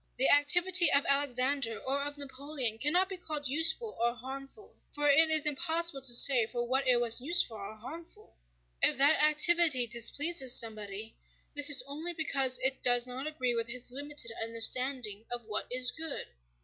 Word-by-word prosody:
The 260 - +3
activity 345 +4 +4
of 280 0 +1
Alexander 275 -3 -1
or 275 +2 -4
of 290 +1 -7
Napoleon 275 -4 -4
cannot 345 +9 +1
be 380 -1 -8
called 305 -4 -4
useful 325 - -1
or 235 +1 -1
harmful, 270 - -12 0.2
for 295 0 -1
it 315 +3 +3
is 310 -1 +1
impossible 320 0 -2
to 255 -2 +2
say 240 -3 +5
for 240 0 -5
what 265 +2 -2
it 245 -1 +3
was 240 0 0
useful 270 -6 +1
or 205 +2 -10
harmful. 290 +10 -14 0.5
If - - +3
that 285 +3 +3
activity 305 -3 +2
displeases 260 +4 +1
somebody, 215 -1 -7 0.4
this 290 +1 +2
is 280 -3 +6
only 310 +5 -6
because 275 -5 0
it 265 0 0
does 245 -1 +2
not 255 +3 -8
agree 255 -6 -3
with 230 -1 -3
his 245 +1 -8
limited 285 -2 -3
understanding 230 -1 -1
of 240 -1 -4
what 215 -1 -5
is 250 0 +3
good. 320 -3 -5
275 Hz, 170 wpm, -29 LUFS, 240-300 Hz, 0.5 s, is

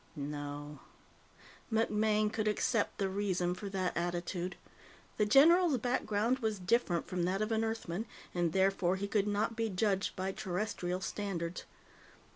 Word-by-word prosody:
No. 145 0 -5 0.9
MacMaine 215 -1 +2
could 215 -1 -1
accept 210 +1 +1
the 195 - 0
reason 190 -2 0
for 200 +2 -6
that 190 -2 -1
attitude; 175 +1 -2 0.6
the 210 - +2
general's 320 - +6
background 240 0 0
was 220 -3 -1
different 180 -2 +1
from 180 -1 -2
that 190 +2 0
of 215 - -3
an 220 0 +2
Earthman, 220 -2 -3 0.3
and 175 -2 +1
therefore 190 0 +2
he 200 +1 -3
could 205 0 +1
not 210 +2 0
be 225 -1 0
judged 195 0 0
by 190 0 -2
Terrestrial 180 -1 -3
standards. 185 -4 -3
200 Hz, 140 wpm, -33 LUFS, 180-220 Hz, 0.9 s, general's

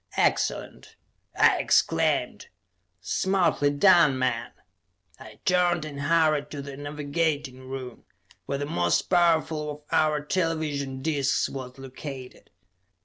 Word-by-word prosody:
"Excellent!" - - -1 0.4
I - - +5
exclaimed. - - +1 0.5
"Smartly 185 - +1
done, 150 -2 +5
men!" 125 -2 -1 0.7
I 110 -1 -13
turned 175 -3 +2
and 140 -2 -7
hurried 155 -1 +2
to 145 -2 -6
the 140 -1 -8
navigating 145 -2 -3
room, 130 -2 -7 0.4
where 140 - -2
the 145 - -3
most 85 -10 +1
powerful 165 -3 +1
of 150 0 -7
our 155 -1 +2
television 150 -6 -2
discs 145 -4 +1
was 130 -1 -8
located. 135 0 -9
145 Hz, 110 wpm, -26 LUFS, 135-160 Hz, 0.7 s, I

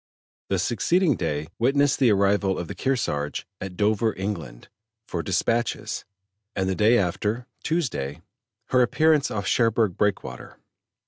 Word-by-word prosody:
The 95 - +1
succeeding 145 - +2
day 75 -4 -2
witnessed 140 +4 +3
the 125 -5 +5
arrival 100 -1 +2
of 85 - -4
the - - -5
Kearsarge 75 - -1
at 95 -2 -7
Dover, 105 +1 +2
England, 85 -12 -5 0.4
for 85 - -2
dispatches, 115 +6 -1 0.5
and 95 -1 0
the 95 - +1
day 110 +5 +4
after 105 +5 -1 0.2
(Tuesday) 85 - -2 0.5
her 125 - +4
appearance 150 +4 +3
off 100 -2 -3
Cherbourg 115 -4 +2
Breakwater. 105 -2 -2
105 Hz, 130 wpm, -25 LUFS, 90-125 Hz, 0.5 s, the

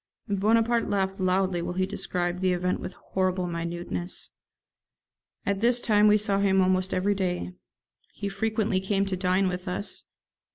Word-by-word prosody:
Bonaparte 225 +3 +2
laughed 195 -1 0
loudly 185 -1 +1
while 175 - -3
he 185 0 +1
described 180 -1 -2
the 185 -1 +2
event 180 +1 0
with 185 - -7 0.2
horrible 185 -1 +1
minuteness. 175 +1 -4 1.1
At 200 -1 0
this 240 +1 +4
time 210 -3 +4
we 210 0 +6
saw 200 -2 0
him 195 -1 +3
almost 185 0 +2
every 195 +3 +1
day. 180 - -2 0.6
He 200 - -5
frequently 215 0 0
came 195 +1 0
to 195 -1 -2
dine 185 +1 +2
with 180 +1 -4
us. 180 +3 -3
190 Hz, 155 wpm, -27 LUFS, 180-205 Hz, 1.1 s, we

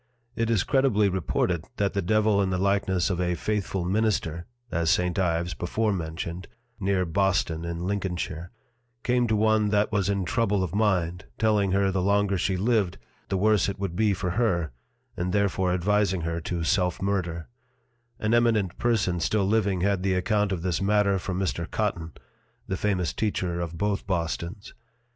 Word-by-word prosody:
It 115 0 0
is 110 -5 +2
credibly 130 -7 +3
reported 90 -2 -1
that 100 -1 0
the 100 - 0
Devil 105 +1 +2
in 95 - +1
the 95 - 0
likeness 95 -1 +1
of 90 0 -1
a 90 0 0
faithful 100 -2 -2
Minister 90 -4 0 0.2
(as 85 -1 +1
St. 90 +2 +1
Ives 85 -1 0
before 105 +7 -1
mentioned, 85 +1 -5 0.3
near 95 -1 +1
Boston 85 -2 0
in 85 0 -4
Lincolnshire) 90 -4 -3 0.5
came 125 0 +2
to 110 - +1
one 110 0 +3
that 105 +1 +2
was 100 -3 +1
in 100 -2 0
trouble 105 -1 +1
of 90 - -4
Mind, 90 -5 0
telling 105 -3 +2
her 100 0 +2
the 95 -1 0
longer 100 +1 +2
she 95 +1 0
lived, 105 -2 +1 0.3
the 95 - 0
worse 105 -2 +3
it 100 - -4
would 95 -3 -3
be 110 +1 +2
for 95 -2 -2
her; 85 - 0 0.4
and 90 +1 -2
therefore 100 -2 +1
advising 95 0 +1
her 85 +1 -2
to 85 +1 -3
Self 90 +2 +1
murder: 90 -4 -2 0.7
An 110 +1 0
eminent 115 -6 +2
Person 105 -7 +1
still 100 +4 +1
living 100 -3 +1
had 100 -1 +1
the 95 0 +1
account 105 +2 +1
of 90 -3 -2
this 90 -1 -1
Matter 100 -1 +2
from 90 0 -4
Mr. 90 -3 -2
Cotton 90 -7 -2 0.5
(the 95 - -1
famous 95 -3 0
Teacher 90 -5 -1
of 85 -1 -5
both 100 +1 -1
Bostons.) 85 +2 -3
95 Hz, 170 wpm, -26 LUFS, 90-105 Hz, 0.7 s, credibly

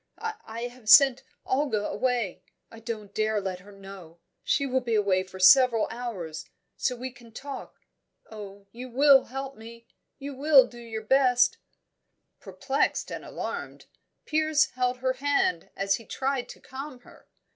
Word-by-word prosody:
"I 435 - -7
have 245 -2 -7
sent 270 0 +8 0.2
Olga 260 -6 0
away 245 -7 -1 0.3
I 225 - -12
daren't 215 -3 -7
let 205 -4 -1
her 200 +3 -15
know 195 -4 -12 0.3
she 280 - +1
will 260 -1 +1
be 235 -2 -1
away 200 -3 +2
for 190 0 -11
several 230 +3 +6
hours, 210 -10 -6 0.3
so 250 - -1
we 255 +2 -6
can 240 -2 -17
talk 275 +4 -9 0.5
oh, 200 -2 -10
you 250 +3 -9
will 275 +2 +5
help 270 +1 -6
me 230 +1 -12 0.3
you 280 0 -7
will 275 -1 +6
do 240 -1 -13
your 225 -2 -6
best 250 +1 +3 0.4
" - - -52
Perplexed 250 +9 -2
and - - -6
alarmed, - - -6 0.4
Piers 310 -1 +2
held 250 0 -1
her 260 0 +1
hand 275 -12 0
as 195 0 0
he 230 - -14
tried 265 -1 -2
to - - -11
calm 265 -1 -9
her. - - -19
245 Hz, 155 wpm, -27 LUFS, 210-270 Hz, 0.5 s, sent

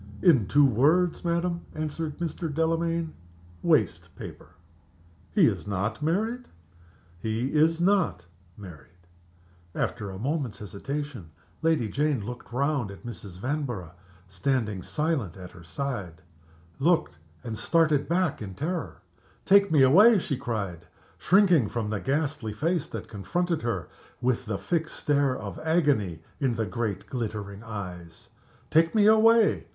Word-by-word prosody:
"In 130 - +5
two 145 +5 +5
words, 155 +9 +3
madam," 170 0 0
answered 155 0 -3
Mr. 165 -1 -3
Delamayn; 165 +1 0 0.5
"waste - - +1
paper." - - -9 0.8
"He - - +5
is - - 0
not 100 +5 -2
married?" 220 +11 -1 0.7
"He 110 +6 -2
is 160 +2 +3
not 175 - +2 0.3
married." 90 -3 -12 0.8
After 105 -4 -2
a 95 - -7
moment's 135 +1 -2
hesitation 120 - -6 0.3
Lady 160 -8 +2
Jane 140 -2 0
looked 125 +1 -8
round 140 -3 0
at 100 +5 -11
Mrs. 100 -6 -8
Vanborough, 120 - -3 0.4
standing 105 +1 -1
silent 140 - -2
at 90 -1 -9
her 90 - -14
side 90 - -5 0.6
looked, 165 - +2 0.2
and 115 -2 -4
started 155 +4 +2
back 180 -4 +1
in 95 -3 -6
terror. 160 - -4 0.4
"Take 200 -1 +5
me 150 -4 +6
away!" 205 - +7
she 160 -6 -1
cried, 100 -9 -4 0.3
shrinking 180 - +4
from 110 -3 -3
the 105 - -1
ghastly 135 -4 -1
face 160 - 0
that - - -7
confronted 170 - -2
her 110 -8 -2 0.3
with 125 -1 0
the 105 -2 -1
fixed 160 - -2
stare 140 -3 +1
of - - -7
agony 145 - +1 0.2
in 130 -5 +1
the 110 -1 -1
great, 105 +1 -3
glittering 105 -5 -5
eyes. 90 -7 -8 0.4
"Take 165 +5 +4
me 210 -2 +5
away! 220 +1 +5
135 Hz, 135 wpm, -27 LUFS, 105-165 Hz, 0.8 s, away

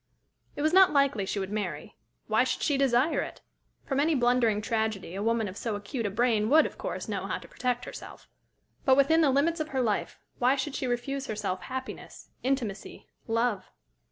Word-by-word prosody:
It 290 - -3
was 310 +2 +2
not 380 0 +7
likely 275 -9 +2
she 210 - -2
would 195 0 -3
marry. 210 -1 -4 0.3
Why - - +3
should - - -2
she 290 - +2
desire 270 +2 +2
it? - - -7 0.4
From 270 -2 -1
any 310 +2 +3
blundering 240 -4 +3
tragedy 220 -5 -2
a 195 - -4
woman 225 0 +1
of 190 - -7
so 220 0 -3
acute 205 +3 -3
a - - -2
brain 220 0 +1
would, 315 +3 +6
of - - -7
course, - - -4
know - - -3
how - - -2
to - - -12
protect 250 -1 -2
herself. - - -10 0.6
But 265 -1 +4
within 320 +4 +5
the 300 - +4
limits 305 +5 +2
of 310 - -2
her 265 -4 -1
life, 215 -3 -1 0.2
why 255 +2 +4
should 275 +1 -3
she 260 - -2
refuse 270 +3 -2
herself 205 -4 -3
happiness, 260 0 -7
intimacy, 250 -6 -3 0.2
love? 225 -4 0
245 Hz, 195 wpm, -28 LUFS, 215-275 Hz, 0.6 s, not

